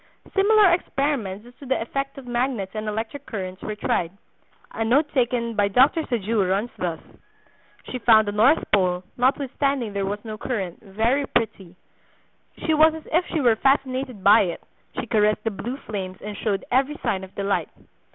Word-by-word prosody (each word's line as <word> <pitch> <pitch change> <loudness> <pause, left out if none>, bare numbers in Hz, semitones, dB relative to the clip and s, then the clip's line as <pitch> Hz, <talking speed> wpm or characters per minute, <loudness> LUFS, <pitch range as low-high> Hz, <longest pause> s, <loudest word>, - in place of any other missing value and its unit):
Similar 405 -2 +5
experiments 270 - -1
as 245 - -15
to 280 - -10
the 265 - +1
effect 275 +4 -4
of 275 - -9
magnets 240 -5 -1
and 215 0 -4
electric 220 +6 -4
currents 185 -4 -5
were 215 - -4
tried. 175 -5 -1 0.6
A 225 - -2
note 285 +7 +2
taken 240 -3 0
by 205 -1 +3
Dr. 260 +10 +4
Sajous 215 -4 0
runs 200 +5 0
thus: 170 -3 -2 0.9
"She 255 - -3
found 220 -3 +5
the - - 0
north 235 +10 +4
pole, 180 -2 +2
notwithstanding 265 -2 0
there 200 -1 -1
was 205 +2 -4
no 215 -1 -6
current, 195 -10 -4
very 225 +8 0
pretty; 195 -6 -2 0.9
she 320 - +2
was 310 +1 +5
as 320 - -9
if 345 +3 +2
she 320 - -1
were 240 -4 +4
fascinated 260 -4 0
by 205 +3 +7
it; 175 -4 -3 0.4
she - - -3
caressed 210 -2 +2
the 225 - -1
blue 240 +6 -5
flames, 190 -7 -6
and 210 0 -7
showed 200 -3 -2
every 270 +4 +2
sign 190 -1 -1
of 190 - -12
delight. 200 0 -1
230 Hz, 175 wpm, -23 LUFS, 200-270 Hz, 0.9 s, by